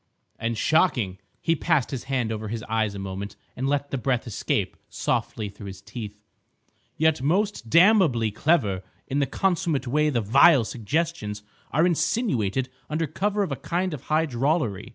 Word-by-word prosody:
"And 115 0 -2
shocking!" 120 - +2 0.2
He 165 - +2
passed 155 -4 +1
his 130 -2 -4
hand 130 -4 -1
over 110 0 -4
his 110 +1 -4
eyes 110 -2 -1
a - - -5
moment 95 +1 -5 0.2
and 130 +2 -1
let 145 0 -1
the 135 - -1
breath 125 0 0
escape 115 - -1
softly 110 - -2
through 100 0 -10
his 95 -1 -8
teeth. 105 0 -8 0.7
"Yet 160 -3 +2
most 180 - 0
damnably 170 - +5
clever 105 - +1 0.2
in 140 - -1
the 140 - +1
consummate 175 -7 0
way 150 +4 +2
the 125 -5 +1
vile 130 +5 +6
suggestions 115 -3 -2 0.3
are 155 +5 +3
insinuated 160 - +1 0.2
under 155 +2 0
cover 205 +7 0
of 195 - -3
a - - 0
kind 180 0 -2
of 145 - -7
high 155 +1 +2
drollery. 125 - -1
135 Hz, 165 wpm, -25 LUFS, 110-165 Hz, 0.7 s, vile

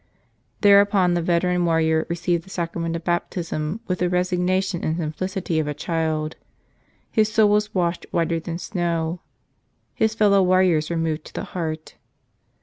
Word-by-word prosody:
Thereupon 200 -3 +5
the 175 - +1
veteran 175 +1 +1
warrior 160 -1 +2
received 170 0 -1
the 190 - -17
Sacra¬ 170 -2 -3
ment 165 0 -2
of 165 - -5
Baptism 175 +1 -2
with 180 -1 -2
the 180 0 +1
resignation 180 +1 0
and 160 +1 -1
simplicity 170 +2 -2
of 155 - -1
a 150 - -3
child. 155 -1 -2 0.7
His 215 -2 +2
soul 215 -1 +4
was 210 0 +1
washed 175 -1 -1
whiter 165 0 0
than 165 +1 -5
snow. 170 -3 -2 0.7
His 220 0 +1
fellow 205 -3 +4
warriors 180 -4 +3
were 170 - -1
moved 160 -1 -2
to - - -12
the - - -3
heart. 160 -3 -4
175 Hz, 155 wpm, -23 LUFS, 165-185 Hz, 0.7 s, Thereupon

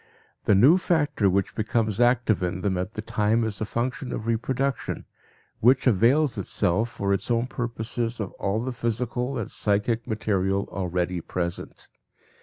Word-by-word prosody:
The 105 - +5
new 140 - +6
factor 145 - +1
which 95 +1 0
becomes 110 -1 0
active 120 -4 +3
in 90 0 -2
them 100 -1 0
at 90 +3 -3
the 110 - -5
time 110 +2 +1
is 110 -2 -2
the 110 - -1
function 125 +4 -3
of 110 - -4
reproduction, 130 +4 -1 0.5
which 125 +3 +4
avails 125 +4 +3
itself 110 +7 0
for 100 -3 -1
its 100 - -3
own 120 0 +2
purposes 120 -1 -3
of 100 -5 -3
all 100 +3 -1
the 130 0 -3
physical 120 +2 -2
and 115 - -4
psychic 110 +3 0
material 100 -3 0
already 90 -1 -2
present. 85 +1 -5
110 Hz, 155 wpm, -25 LUFS, 100-120 Hz, 0.5 s, new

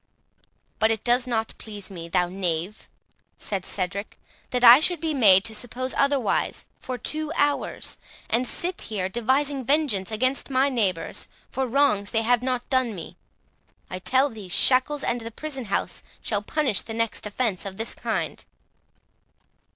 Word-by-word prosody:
"But 220 - +4
it 225 -2 -1
does 245 +1 +2
not 225 -2 -1
please 205 -2 -7
me, 170 -3 -8
thou 180 +1 +2
knave," 180 +1 -3 0.5
said 195 -3 -3
Cedric, 200 +2 -3 0.3
"that 250 -1 -1
I 240 +2 +11
should 345 +2 +2
be 320 -1 -1
made 200 -8 +6
to 225 - -1
suppose 250 +3 -3
otherwise 280 -4 +1
for 255 - -5
two 310 +5 -2
hours, 290 0 0 0.3
and 245 +2 +1
sit 360 +1 0
here 190 -4 -2
devising 265 +5 0
vengeance 270 -9 +1
against 255 +6 0
my 270 +1 +3
neighbours 200 -10 -1 0.2
for 265 0 -1
wrongs 235 -6 +2
they 225 -1 0
have 240 +1 +3
not 250 -1 -2
done 255 -4 +1
me. 170 - -8 0.8
I 185 - -4
tell 260 +8 +3
thee, 210 -4 -10
shackles 260 +8 +3
and 240 0 -1
the 225 - -6
prison 270 +1 -5
house 200 - -2 0.2
shall 205 -3 0
punish 260 - 0
the 225 - -7
next 230 -2 -2
offence 210 -3 -1
of 195 -2 -7
this 225 +1 -3
kind." - - -3
235 Hz, 160 wpm, -25 LUFS, 205-265 Hz, 0.8 s, I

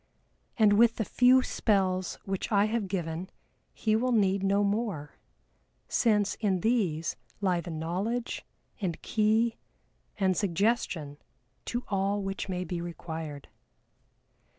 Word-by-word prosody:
And 210 -2 +5
with 235 -1 +6
the 220 - -1
few 255 +4 +5
spells 185 -6 0
which 195 +2 -3
I 205 -1 +4
have 215 -2 -1
given 175 -1 -3 0.4
he 215 -1 0
will 250 +3 +1
need 200 -4 +3
no 200 +1 +2
more, 200 -8 -2 0.7
since 210 -4 +2
in 195 -5 +1
these 180 -9 +1 0.2
lie 185 -4 +1
the 175 - -8
knowledge, 185 +9 -2 0.4
and 175 -5 -2
key, 220 +2 +2 0.6
and 190 -2 +2
suggestion 175 -6 0 0.5
to 240 +1 -3
all 200 0 0
which 195 0 -4
may 180 -1 -2
be 175 -1 -4
required. 160 -4 -6
195 Hz, 125 wpm, -29 LUFS, 175-220 Hz, 0.7 s, with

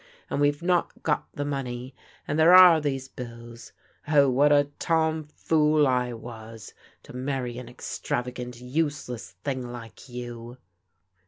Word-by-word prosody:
And 145 - 0
we've 145 +2 +1
not 175 0 0
got 150 - 0
the 145 - -4
money. 130 -2 -4 0.3
And 145 +2 -1
there 170 +3 +7
are 180 -4 +9
these 135 -3 -2
bills. 120 -2 -10 0.4
Oh, 140 -3 +5
what 145 +4 +4
a 145 0 +4
tom 160 -2 +1
fool 150 0 +2
I 125 -2 +1
was 115 -1 -10 0.3
to - - -12
marry 125 -2 -3
an 125 -2 -9
extravagant, 125 0 -4
use 145 +3 -2
less 120 -2 -7
thing 135 -2 -2
like 120 +1 -10
you 120 0 -8
130 Hz, 145 wpm, -26 LUFS, 120-150 Hz, 0.4 s, are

